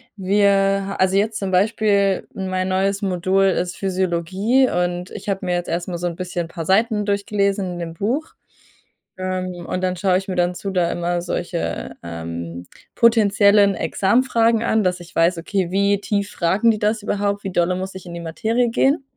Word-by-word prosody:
wir 195 0 +2
also, 190 +1 +3
jetzt 215 +1 0
zum 195 -2 -3
Beispiel 200 0 +2
mein 185 -1 -2
neues 195 +2 0
Modul 190 0 +1
ist 180 -2 0
Physiologie 190 +6 +1
und 175 0 -2
ich - - -7
habe 195 -1 -2
mir 180 -1 0
jetzt 175 - -3
erstmal 175 +1 -2
so 175 +1 -2
'n 170 - -4
bisschen 180 -1 -3
'n 165 - -14
paar 165 -2 -6
Seiten 210 +2 +2
durchgelesen 200 -2 0
in 175 - -7
dem 165 -1 -5
Buch, 240 - -2 0.8
ähm, 185 -2 -4
und 185 - -2
dann 185 0 0
schaue 185 0 +2
ich 190 +1 -5
mir 185 - -3
dann 175 0 +1
zu 190 +2 -5
da 180 -2 +1
immer 175 0 -1
solche, 175 0 -4
ähm, 85 +1 -6 0.3
potenziellen 205 -3 +4
Examfragen 230 - +2
an, 220 -2 +2
dass 180 -1 0
ich 175 -1 -14
weiß, 170 +1 +3
okay: 185 0 -2
„Wie 200 +1 +2
tief 205 -1 -1
fragen 190 +7 +2
die 215 - -3
das 215 +1 0
überhaupt, 205 -1 -1
wie 195 - -4
dolle 175 0 +1
muss 190 +1 -5
ich 190 -1 -9
in 175 - -8
die 170 - -6
Materie 220 +9 0
gehen?“ 270 +5 +2
190 Hz, 185 wpm, -21 LUFS, 175-205 Hz, 0.8 s, potenziellen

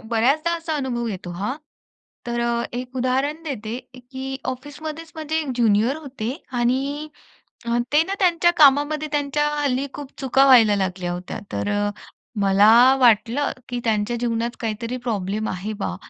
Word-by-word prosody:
बऱ्याचदा 270 +9 +2
असा 330 -1 -4
अनुभव 250 -4 -2
येतो 185 -4 -6
हां. 205 +10 -3 0.7
तर 240 0 -2
अ, 235 0 0
एक 250 +1 -6
उदाहरण 265 +5 0
देते 240 -7 -5 0.3
की 265 0 -5
ऑफिसमध्येच 300 +5 -6
म्हणजे 315 0 -2
ज्युनियर 230 +2 +2
होते 265 -7 -5 0.3
आणि 275 +5 0 0.6
अ, 235 0 0 0.2
ते 300 - +6
ना 385 - -4
त्यांच्या 345 -2 +4
कामामध्ये 290 +1 +4
त्यांच्या 295 0 0
हल्ली 280 -2 0
खूप 285 -2 -8
चुका 270 0 +3
व्हायला 230 -6 +7
लागल्या 185 -2 -2
होत्या. 180 +1 -6
तर 205 - -2
अ, 205 0 0 0.5
मला 200 +2 +5 0.3
वाटलं 240 +3 +3 0.2
की 245 - -3
त्यांच्या 220 +1 0
जीवनात 235 0 -2
काहीतरी 230 +2 -3
प्रॉब्लेम 210 0 -2
आहे 190 +4 -4
बा. 90 - -3
250 Hz, 145 wpm, -22 LUFS, 220-290 Hz, 0.7 s, व्हायला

